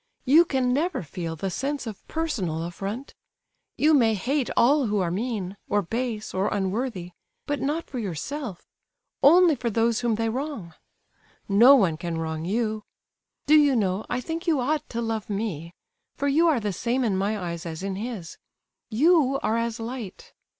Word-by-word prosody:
You 310 +6 +6
can 260 -4 0
never 320 - 0
feel 165 +1 -5
the 190 +4 -3
sense 275 +7 -3
of 215 -4 -8
personal 195 - -2
affront. 195 +9 -5 0.6
You 310 +1 +4
may 230 -6 +4
hate 255 +7 -1
all 275 +1 +4
who 210 0 0
are 180 -3 0
mean, 200 -2 -3
or 205 0 +2
base, 225 +2 -3
or 190 +2 0
unworthy—but 200 +5 -4
not 300 +4 -1
for 255 - -5
yourself—only 280 - 0
for 245 -3 -2
those 230 +1 +1
whom 235 -2 +1
they 225 +1 -1
wrong. 235 - -4 0.7
No 235 +8 +7
one 185 - +2
can 170 0 -4
wrong 160 0 -3
you. 215 +2 -1 0.6
Do 300 - +3
you 295 -3 +6
know, 195 -2 0
I 245 - -1
think 330 +5 -5
you 315 -4 +3
ought 300 +4 -1
to 235 - -3
love 225 -2 -3
me—for 205 - -5
you 315 +5 +4
are 305 -7 +3
the 205 -3 -2
same 240 +7 -1
in 215 -5 +1
my 200 +3 0
eyes 170 -1 -5
as 160 +2 -6
in 195 -1 -2
his—you 250 - -1
are 225 - +1
as 230 0 -2
light. 230 -4 -7
230 Hz, 165 wpm, -25 LUFS, 190-275 Hz, 0.7 s, No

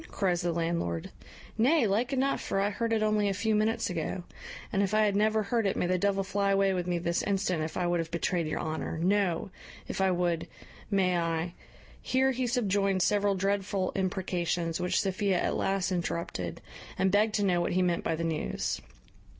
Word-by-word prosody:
cries 180 -3 0
the 175 -1 0
landlord; 165 - -2 0.5
"nay, 265 +3 +4
like 220 +6 +1
enough, 275 0 +1
for 195 - -1
I 200 +1 +1
heard 230 +3 -2
it 220 -1 +2
only 215 -1 +2
a 195 - -1
few 220 +3 0
minutes 215 +1 +1
ago; 180 +1 -3 0.5
and 195 - +2
if 200 +1 +1
I 215 - +4
had 205 -2 +2
never 215 +1 +2
heard 225 0 0
it, 195 - -1
may - - +1
the 180 +1 +1
devil 195 0 +1
fly 200 +1 0
away 195 0 +3
with 180 -1 -2
me 175 -1 0
this 170 0 0
instant 195 -4 0
if 155 +1 -4
I 180 - 0
would 175 0 +1
have 165 -1 -3
betrayed 170 0 -1
your 155 - -2
honour! 160 +1 -3
no, 185 0 +1 0.4
if - - -3
I 190 - +4
would, 175 -2 0 0.4
may 185 -3 +2
I 165 0 -1 0.2
" - - -23
Here 265 +1 +2
he 255 -1 -1
subjoined 200 -5 +1
several 205 +1 +2
dreadful 195 0 0
imprecations, 180 -3 -1
which 180 0 +1
Sophia 195 -1 +1
at - - 0
last 195 -1 0
interrupted, 170 - -3 0.4
and 190 - +2
begged 210 +2 +3
to 205 - +1
know 175 -2 +2
what - - -1
he 185 +1 +3
meant 175 -1 0
by 165 - 0
the 165 - -3
news. 160 -2 -2
190 Hz, 205 wpm, -29 LUFS, 175-205 Hz, 0.5 s, nay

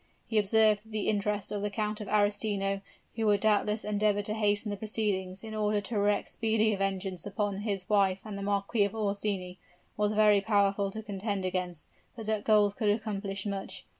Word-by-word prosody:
He 220 - +2
observed 210 0 +3
that 220 - -19
the 215 -2 -2
interest 210 -1 -1
of 205 - -2
the 205 - -1
Count 210 +1 -2
of 210 - -6
Arestino, 205 -1 +1 0.3
who 225 -1 0
would 205 -1 +3
doubtless 210 0 +2
endeavor 210 0 +1
to 210 - -1
hasten 210 -1 +1
the - - -2
proceedings 200 -3 -2
in 220 -1 -7
order 210 -1 +1
to 205 +1 -3
wreak 205 0 +1
speedy 220 -1 +1
vengeance 195 -2 -2
upon 205 -1 -2
his 200 -3 -3
wife 195 -2 +2
and 210 -2 -6
the 200 - -5
Marquis 200 +2 +1
of 200 - -4
Orsini, 200 -3 -2 0.4
was 210 0 +1
very 210 -1 +5
powerful 200 -1 +2
to 220 +3 -6
contend 200 -1 -3
against; 180 -3 -3 0.3
but 225 -2 -7
that 215 -1 -1
gold 210 -2 +4
could 215 -3 +1
accomplish 205 -2 -2
much. 200 -1 -4
205 Hz, 190 wpm, -30 LUFS, 195-215 Hz, 0.4 s, very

